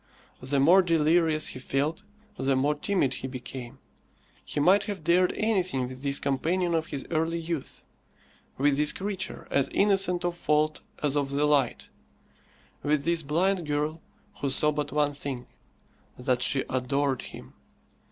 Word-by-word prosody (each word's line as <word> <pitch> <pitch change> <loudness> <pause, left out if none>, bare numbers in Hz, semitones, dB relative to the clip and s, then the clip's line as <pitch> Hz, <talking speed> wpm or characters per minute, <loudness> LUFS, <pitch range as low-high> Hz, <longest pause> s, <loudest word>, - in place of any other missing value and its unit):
The 135 +2 0
more 175 +8 +6
delirious 165 -2 +2
he - - -8
felt, 140 +7 -1 0.3
the 135 -7 +1
more 140 +3 +2
timid 150 -2 0
he 130 - -5
became. 130 0 -8 0.7
He - - -4
might 190 +7 +4
have 200 -6 -5
dared 180 +3 +3
anything 185 - 0
with 130 0 -9
this 140 0 0
companion 170 +6 0
of 160 -1 0
his 140 -5 -5
early 165 +1 0
youth, 165 -4 -5 0.7
with 140 +1 +2
this 150 0 +4
creature 190 -1 -4
as 140 - +2
innocent 195 -3 +2
of 175 -1 -1
fault 150 -1 +1 0.2
as 145 -1 +1
of 140 -1 0
the 140 +2 +1
light, 145 -5 +1 0.9
with 145 -1 0
this 170 -1 +3
blind 170 +4 0
girl 150 +2 -1 0.4
who 140 - -1
saw 150 +3 +2
but 150 -1 -3
one 145 0 +1
thing 135 -3 -5 0.7
that 125 0 0
she 135 +1 +1
adored 130 +1 0
him! - - -11
150 Hz, 150 wpm, -27 LUFS, 135-170 Hz, 0.9 s, more